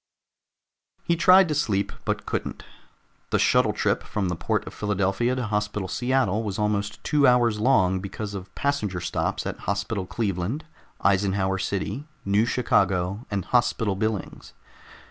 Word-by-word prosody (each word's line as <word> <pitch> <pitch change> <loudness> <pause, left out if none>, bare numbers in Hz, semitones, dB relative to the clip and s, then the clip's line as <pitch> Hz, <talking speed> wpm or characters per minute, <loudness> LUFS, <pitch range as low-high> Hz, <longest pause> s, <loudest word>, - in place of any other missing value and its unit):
He 170 - +1
tried 185 +2 +6
to - - +1
sleep, 105 -9 0
but - - -2
couldn't. - - -4 0.7
The - - +2
shuttle - - +3
trip - - 0
from 100 -4 -2
the 90 - -1
Port 85 - -1
of - - -8
Philadelphia 105 +4 0
to 125 -2 -2
Hospital 105 -2 -2
Seattle 120 -1 +1
was 105 -4 -4
almost 105 -1 -1
two 145 -2 +3
hours 120 -3 +3
long 95 -6 +3
because 100 +2 -6
of 95 -1 -8
passenger 125 -11 -1
stops 85 0 -2
at - - -4
Hospital 100 -1 -2
Cleveland, 105 - -2 0.4
Eisenhower 95 -1 +2
City, 100 +10 -3 0.2
New 100 +4 +2
Chicago, 95 -3 +1
and 100 -3 -2
Hospital 115 -4 +1
Billings. 110 0 -3
105 Hz, 145 wpm, -25 LUFS, 95-120 Hz, 0.7 s, tried